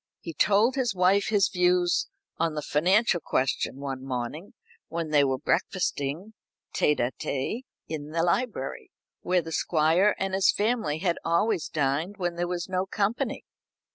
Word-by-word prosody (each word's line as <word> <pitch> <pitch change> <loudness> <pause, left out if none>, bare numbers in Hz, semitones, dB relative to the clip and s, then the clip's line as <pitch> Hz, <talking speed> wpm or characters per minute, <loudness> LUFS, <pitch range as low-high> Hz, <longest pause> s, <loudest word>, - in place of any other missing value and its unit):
He 165 - -7
told 205 - +3
his 255 -6 -1
wife 190 +2 +3
his 205 -2 +3
views 180 -1 +2 0.3
on 165 -1 0
the 150 - -3
financial 180 +7 +2
question 130 0 -1
one 135 -2 -5
morning 135 +7 -5 0.3
when 165 -2 -4
they 145 -2 +5
were 135 -1 +1
breakfasting 170 +2 -1 0.4
tête 150 - +2
à 120 +1 0
tête 215 - -3 0.2
in 150 -2 -5
the 165 +1 0
library, 175 - -1 0.3
where 180 -1 +1
the 165 - -7
Squire 165 +6 +2
and 195 0 -2
his 190 0 +4
family 210 -8 0
had 170 0 -1
always 170 +2 +1
dined 155 +7 -1
when 175 -3 -1
there 175 +1 -2
was 175 -1 -3
no 185 0 -1
company. 210 +4 -1
175 Hz, 155 wpm, -27 LUFS, 150-195 Hz, 0.4 s, they